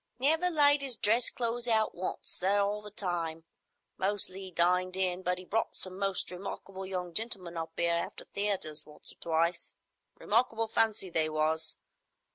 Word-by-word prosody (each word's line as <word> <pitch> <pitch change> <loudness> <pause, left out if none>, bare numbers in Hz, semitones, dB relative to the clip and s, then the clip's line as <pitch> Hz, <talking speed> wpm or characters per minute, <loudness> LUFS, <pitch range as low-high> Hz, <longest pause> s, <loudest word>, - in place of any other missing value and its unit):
"Never 320 +7 +3
laid 290 -3 +6
'is 270 -3 +1
dress 225 +3 +3
clothes 240 0 -2
out 220 -2 +3
once, 185 +1 -4
sir, 195 +3 +1
all 205 +1 0
the 210 - -4
time. 170 -5 -3 0.6
Mostly 195 -1 0
'e 185 - -9
dined 180 +2 +2
in; 185 -1 0
but 180 0 0
'e 185 - -9
brought 225 +5 -1
some 185 0 -7
most 195 -2 0
remarkable 190 +1 -6
young 180 -2 -4
gentlemen 190 -5 -2
up 165 -1 -4
'ere 170 0 +3
after 195 - -8
theatres 195 -7 -1
once 150 - -13
or - - -13
twice. 170 +1 0 0.4
Remarkable 225 0 +1
fancy 215 -4 +3
they 160 -1 +1
was. 155 +1 -1
190 Hz, 165 wpm, -31 LUFS, 175-220 Hz, 0.6 s, laid